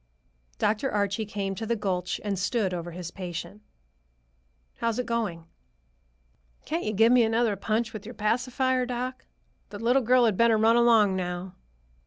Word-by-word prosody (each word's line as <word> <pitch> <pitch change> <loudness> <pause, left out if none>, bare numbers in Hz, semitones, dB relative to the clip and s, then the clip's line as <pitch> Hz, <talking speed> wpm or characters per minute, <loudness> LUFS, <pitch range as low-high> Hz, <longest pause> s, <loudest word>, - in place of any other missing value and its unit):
Dr. 220 +6 0
Archie 205 +1 -1
came 200 -2 -3
to 220 +3 -5
the 235 - +1
gulch 185 -4 -2
and 200 -3 -2
stood 200 -1 0
over 175 -1 -4
his 175 0 -7
patient. 180 +2 -7 1.2
"How's 230 -1 -1
it 250 - -1
going?" 210 -8 -2 1.2
"Can't 330 +3 -2
you 215 - 0
give 225 +3 +4
me 250 -1 +6
another 225 -1 +2
punch 220 +3 -1
with 215 - -7
your 235 +3 -9
pacifier, 250 +3 0
doc? 250 +1 -4 0.4
The 205 - -8
little 240 +5 +2
girl 250 +1 +4
had 215 -5 +1
better 230 -1 +4
run 225 +2 +4
along 225 -5 +4
now." 180 0 -4
220 Hz, 160 wpm, -27 LUFS, 195-235 Hz, 1.2 s, me